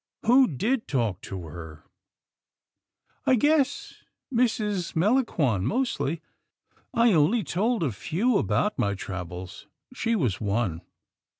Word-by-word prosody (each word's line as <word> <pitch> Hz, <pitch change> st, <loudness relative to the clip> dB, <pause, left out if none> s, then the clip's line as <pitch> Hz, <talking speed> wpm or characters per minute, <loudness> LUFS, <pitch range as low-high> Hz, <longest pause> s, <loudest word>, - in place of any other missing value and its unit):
" -, -, -21 dB
Who 255 Hz, +3 st, +6 dB
did 220 Hz, -, -1 dB
talk 115 Hz, -9 st, -1 dB
to 95 Hz, -3 st, -7 dB
her?" 80 Hz, -1 st, -10 dB, 0.7 s
" -, -, -46 dB
I 260 Hz, -, +6 dB
guess 285 Hz, +2 st, +1 dB, 0.3 s
Mrs. 215 Hz, -7 st, 0 dB
Melangon 165 Hz, -, +2 dB
mostly. 170 Hz, -, -1 dB, 0.7 s
I 235 Hz, -3 st, +4 dB
only 180 Hz, +9 st, +3 dB
told 205 Hz, -, 0 dB
a 140 Hz, -, 0 dB
few 195 Hz, -, 0 dB
about 210 Hz, -, 0 dB
my 100 Hz, -1 st, +1 dB
travels. 90 Hz, -1 st, -7 dB, 0.3 s
She 230 Hz, -2 st, 0 dB
was 125 Hz, -, 0 dB
one. 100 Hz, -5 st, -1 dB
170 Hz, 120 wpm, -26 LUFS, -, 0.7 s, Who